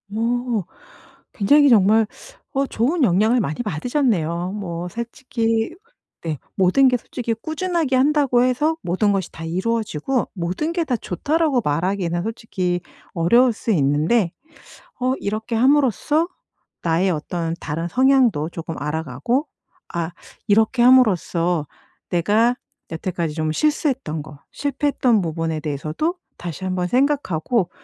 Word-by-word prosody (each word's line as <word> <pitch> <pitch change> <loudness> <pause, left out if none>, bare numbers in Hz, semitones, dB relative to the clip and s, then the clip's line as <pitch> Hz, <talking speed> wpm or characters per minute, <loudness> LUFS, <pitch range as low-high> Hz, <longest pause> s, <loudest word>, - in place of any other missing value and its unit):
어 235 -1 0 0.7
굉장히 285 +8 +5
정말 220 -1 +5 0.5
어 275 0 +1
좋은 275 +9 0
영향을 220 +4 +3
많이 155 +1 -3
받으셨네요. 180 - -1
뭐 175 -4 -4
솔직히 230 - -2 0.5
네. 160 -3 -3 0.2
모든 190 +9 +4
게 250 - +2
솔직히 235 0 -4
꾸준하게 315 +3 -1
한다고 270 -2 +3
해서 275 +6 +1
"모든 185 +4 +1
것이 195 -3 -2
다 165 - -8
이루어지고 220 - -1
모든 185 - -2
게 340 -1 0
다 255 -6 -1
좋다."라고 285 - 0
말하기에는 175 +2 -1
솔직히 185 -5 -2 0.3
어려울 235 +9 +4
수 225 - -3
있는데 160 +5 +2 0.7
어 255 +1 +1
이렇게 215 +3 -3
함으로써 285 - +3 0.5
나의 170 +3 +2
어떤 165 +1 -2
다른 165 +3 -3
성향도 250 - +3
조금 165 -1 -6
알아 150 +2 -2
가고 235 - -1 0.5
아 170 -1 -1 0.4
이렇게 220 +4 +3
함으로써 180 - +3 0.4
내가 215 +8 +2 0.3
여태까지 165 -1 -3
좀 155 -1 -1
실수했던 265 - 0
거 150 -1 -12
실패했던 275 -5 +1
부분에 165 -1 -2
대해서도 155 - -2 0.2
다시 175 +1 -6
한번 185 -1 -1
생각하고 245 - +1
215 Hz, 290 characters per minute, -21 LUFS, 170-255 Hz, 0.7 s, 굉장히